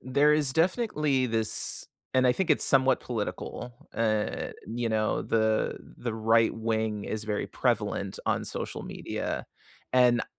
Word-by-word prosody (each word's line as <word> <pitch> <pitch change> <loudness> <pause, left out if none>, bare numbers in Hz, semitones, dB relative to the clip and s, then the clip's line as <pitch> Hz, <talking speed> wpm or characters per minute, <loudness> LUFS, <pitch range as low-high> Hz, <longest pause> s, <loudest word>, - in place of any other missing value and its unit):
there 140 +4 +3
is 145 -3 +2
definitely 155 - +1
this 110 -1 0 0.3
and 130 0 +4
I 125 - +5
think 190 +2 -1
it's 150 - +4
somewhat 130 -1 +4
political, 120 +1 -4 0.2
and, 110 -2 0
you 115 +1 -2
know, 110 -1 +1
the 110 -1 +1 0.2
the 120 -2 -3
right 115 +1 +3
wing 110 -2 -1
is 110 0 -3
very 105 -1 -2
prevalent - - -1
on - - +1
social - - -5
media, - - -4 0.5
and, 125 -2 +5
uh, - - -2
120 Hz, 145 wpm, -28 LUFS, 110-130 Hz, 0.5 s, I